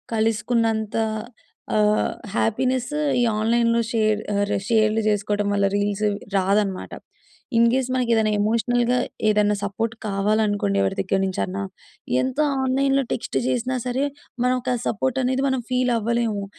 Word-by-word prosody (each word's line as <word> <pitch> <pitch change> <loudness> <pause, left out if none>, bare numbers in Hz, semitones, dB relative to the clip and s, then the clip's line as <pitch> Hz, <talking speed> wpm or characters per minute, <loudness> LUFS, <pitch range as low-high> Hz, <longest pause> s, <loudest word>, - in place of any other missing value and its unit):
కలుసుకున్నంతా 225 0 0 0.7
ఆహ్, 210 0 +2 0.2
హ్యాపీనెస్స్ 255 +5 0 0.3
ఈ - - +3 0.2
ఆన్లైన్లో 230 +1 +2
షేర్ 215 -1 +2
ఆహ్, 200 0 +1
రే - - +1
షేర్లు 220 -1 +3
చేసుకోటం 205 0 0
వల్ల 200 0 +2
రీల్స్ 205 +1 0 0.3
రాదనమాట. 195 0 0 0.7
ఇన్‌‌‌‌‌‌‌‌కేస్ 245 +3 +3
మనకేదన్నా 230 -4 +2
ఎమోషనల్‌గా 240 +3 +1 0.3
ఏదన్నా 210 0 +3
సపోర్ట్ 220 +3 -2
కావాలనుకోండి 205 - +1
ఎవరి 95 - 0
దగ్గర 190 - 0
నించన్నా, 190 +1 -2 0.6
ఎంత 260 +3 -3 0.2
ఆన్లైన్లో 270 +1 +2
టెక్స్ట్ - - -2
చేసినా 255 0 0
సరే, 260 +3 0 0.4
మనం 250 0 +3
ఒక 250 - -1
సపోర్టనేది 260 +3 0
మనం 260 -2 0
ఫీలవ్వలేము. 235 -4 0
225 Hz, 115 wpm, -23 LUFS, 205-250 Hz, 0.7 s, ఈ